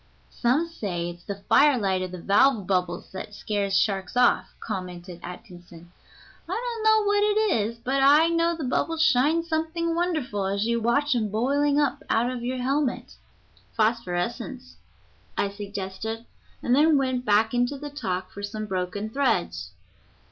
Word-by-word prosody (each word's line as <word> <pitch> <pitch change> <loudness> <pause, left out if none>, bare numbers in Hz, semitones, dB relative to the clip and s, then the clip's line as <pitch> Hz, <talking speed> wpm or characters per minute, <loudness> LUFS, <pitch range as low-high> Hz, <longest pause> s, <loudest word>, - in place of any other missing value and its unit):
"Some 265 +8 +1
say 180 - -4
it's 175 0 -14
the 200 0 -7
fire 290 -2 +5
light 190 -4 0
of 185 -1 -4
the 180 - -6
valve 205 +4 +3
bubbles 180 -2 -1
that 200 +2 -7
scares 200 -2 -1
sharks 195 +2 0
off," 245 0 +3
commented 180 -3 -6
Atkinson. 175 -2 -11 0.6
"I - - -1
don't 470 -2 -3
know 435 -1 +4
what 410 0 +3
it 420 - +2
is, 230 +1 -8
but 265 +4 -1
I 290 +4 +6
know 335 0 +1
the 315 - -4
bubbles 320 +5 0
shine 310 +3 +3
something 330 +1 -1
wonderful 310 - -1
as 200 +2 0
you 235 0 0
watch 280 +5 +2
'em 220 -4 0
boiling 280 +7 +1
up 290 0 0
out 235 +2 +2
of 245 -2 -5
your 255 +1 -2
helmet." 270 +1 -1 0.6
"Phosphorescence," 230 +3 -2 0.6
I 200 - 0
suggested, 205 +2 -5 0.4
and 245 - +2
then 300 +1 +5
went 260 -2 0
back 220 0 +3
into 245 +3 +1
the 290 +1 -7
talk 190 -11 -3
for 200 - -9
some 215 +1 -4
broken 190 +1 -3
threads. 95 - -1
235 Hz, 160 wpm, -25 LUFS, 195-290 Hz, 0.6 s, I